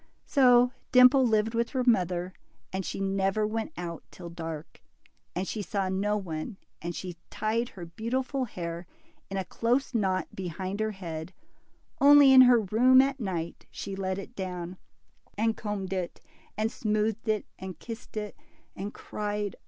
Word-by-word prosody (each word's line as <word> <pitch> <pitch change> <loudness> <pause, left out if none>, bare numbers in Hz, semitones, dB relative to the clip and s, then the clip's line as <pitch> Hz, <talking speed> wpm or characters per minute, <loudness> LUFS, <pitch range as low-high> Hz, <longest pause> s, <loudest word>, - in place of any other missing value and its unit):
So 250 -3 +5 0.2
Dimple 255 +1 +7
lived 220 0 +2
with 235 0 0
her 260 -2 -1
mother, 180 -5 +2 0.4
and 190 0 -1
she - - -4
never 195 +2 +1
went 220 +6 -2
out 170 -1 -5
till 175 -2 -10
dark, 165 -2 -7 0.5
and 185 +2 -2
she 215 - -3
saw 195 +1 -1
no 205 +3 0
one, 185 +2 -5 0.2
and 170 0 -4
she 180 -2 -6
tied 225 +3 -1
her 175 -3 -9
beautiful 255 - -2
hair 170 -4 -6 0.4
in 195 - -3
a 190 - -2
close 245 +9 0
knot 190 -5 +1
behind 185 +2 -4
her 220 0 +1
head 170 -4 -6 0.7
Only 285 -1 +8
in 260 - +10
her 240 -2 +6
room 245 +6 +5
at 270 +1 +3
night, 175 -7 -4
she 195 - -6
let 190 -1 -2
it 200 +5 -8
down, 180 -1 -5 0.6
and 225 +1 +2
combed 200 -3 -4
it, 185 -2 -3 0.4
and 220 +1 0
smoothed 215 0 -1
it, 215 -2 +1
and 190 -1 -7
kissed 225 -1 -9
it, 210 -1 -4 0.4
and 200 +3 -6
cried 210 -1 -3
DIMPLE. - - -17
205 Hz, 160 wpm, -28 LUFS, 185-230 Hz, 0.7 s, in